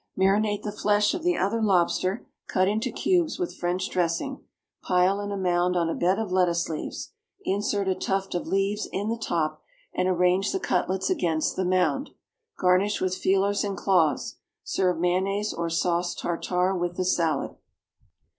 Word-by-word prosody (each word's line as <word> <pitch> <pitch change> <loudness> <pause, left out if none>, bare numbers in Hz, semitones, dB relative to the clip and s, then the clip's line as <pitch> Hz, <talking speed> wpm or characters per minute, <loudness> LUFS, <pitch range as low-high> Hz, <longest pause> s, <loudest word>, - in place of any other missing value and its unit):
Marinate 205 +2 +2
the 210 - -3
flesh 205 0 +2
of 355 - -3
the 355 -1 +1
other 215 +4 0
lobster, 185 0 +1 0.2
cut 185 0 +2
into 220 +5 0
cubes, 345 +4 +1
with 360 -2 -3
French 180 +2 -1
dressing; 180 +10 -1 0.4
pile 185 +2 +2
in 205 0 -4
a 200 - -2
mound 180 -1 +1
on 170 -1 +1
a - - 0
bed 185 +3 +1
of 220 -4 -3
lettuce 175 -2 +2
leaves. 155 - -5 0.3
Insert 200 0 0
a 190 - +3
tuft 195 +1 -2
of 175 - -3
leaves 195 +2 0
in 200 +3 -2
the 230 - 0
top, 155 -8 -2 0.3
and 185 - 0
arrange 180 +2 +2
the 380 - 0
cutlets 190 - 0
against 160 -3 0
the 185 - -1
mound. 180 - +1 0.5
Garnish 185 +3 +2
with 185 0 0
feelers 195 +2 +1
and 200 -1 -3
claws. 175 -6 +1 0.3
Serve 180 -3 0
mayonnaise 195 +4 0
or 170 0 -2
sauce 175 +1 0
tartare 180 +2 -1
with 175 -1 -2
the 185 - 0
salad. 165 -5 0
185 Hz, 165 wpm, -26 LUFS, 175-205 Hz, 0.5 s, a